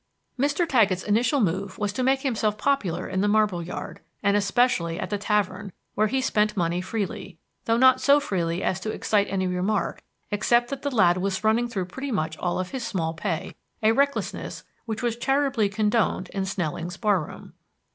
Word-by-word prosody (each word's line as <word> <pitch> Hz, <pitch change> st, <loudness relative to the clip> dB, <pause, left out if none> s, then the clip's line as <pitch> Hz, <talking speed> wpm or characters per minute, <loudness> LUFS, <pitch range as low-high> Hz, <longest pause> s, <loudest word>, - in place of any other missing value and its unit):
Mr. 290 Hz, +6 st, +2 dB
Taggett's 210 Hz, -, +3 dB
initial 230 Hz, +7 st, +2 dB
move 190 Hz, -1 st, -1 dB
was 205 Hz, -1 st, -2 dB
to 260 Hz, -, -2 dB
make 265 Hz, +1 st, +2 dB
himself 220 Hz, -6 st, 0 dB
popular 275 Hz, -12 st, 0 dB
in 190 Hz, 0 st, -1 dB
the 205 Hz, -, +2 dB
marble 205 Hz, -4 st, +2 dB
yard, 170 Hz, +2 st, -6 dB, 0.2 s
and 200 Hz, 0 st, +3 dB
especially 195 Hz, -4 st, +1 dB
at -, -, -4 dB
the 205 Hz, -, 0 dB
tavern, 210 Hz, -1 st, -1 dB, 0.2 s
where 215 Hz, +1 st, +2 dB
he 265 Hz, +5 st, 0 dB
spent 210 Hz, -4 st, +1 dB
money 175 Hz, 0 st, 0 dB
freely, 190 Hz, -2 st, -4 dB, 0.3 s
though 230 Hz, 0 st, +2 dB
not 260 Hz, +1 st, +5 dB
so 285 Hz, +1 st, +5 dB
freely 180 Hz, -9 st, -2 dB
as 185 Hz, -, 0 dB
to 215 Hz, -, -4 dB
excite 210 Hz, -1 st, +1 dB
any 190 Hz, -1 st, -1 dB
remark 185 Hz, +3 st, -1 dB, 0.3 s
except 240 Hz, +4 st, +2 dB
that 275 Hz, -1 st, -4 dB
the 285 Hz, -, -1 dB
lad 185 Hz, -9 st, +4 dB
was 195 Hz, +2 st, -2 dB
running 225 Hz, +3 st, +2 dB
through 195 Hz, -6 st, -3 dB
pretty 265 Hz, +10 st, -6 dB
much 160 Hz, -7 st, -1 dB
all 175 Hz, -1 st, -1 dB
his 235 Hz, +7 st, -6 dB
small 165 Hz, -7 st, -2 dB
pay, 165 Hz, -1 st, -3 dB, 0.3 s
a 215 Hz, -, +5 dB
recklessness 280 Hz, +4 st, -1 dB, 0.2 s
which 225 Hz, +2 st, -4 dB
was 235 Hz, -2 st, 0 dB
charitably 270 Hz, -3 st, +1 dB
condoned 210 Hz, -2 st, 0 dB
in 195 Hz, -1 st, -2 dB
Snelling's 175 Hz, -1 st, -3 dB
bar 205 Hz, -6 st, +2 dB
room. -, -, -11 dB
210 Hz, 185 wpm, -25 LUFS, 185-240 Hz, 0.3 s, not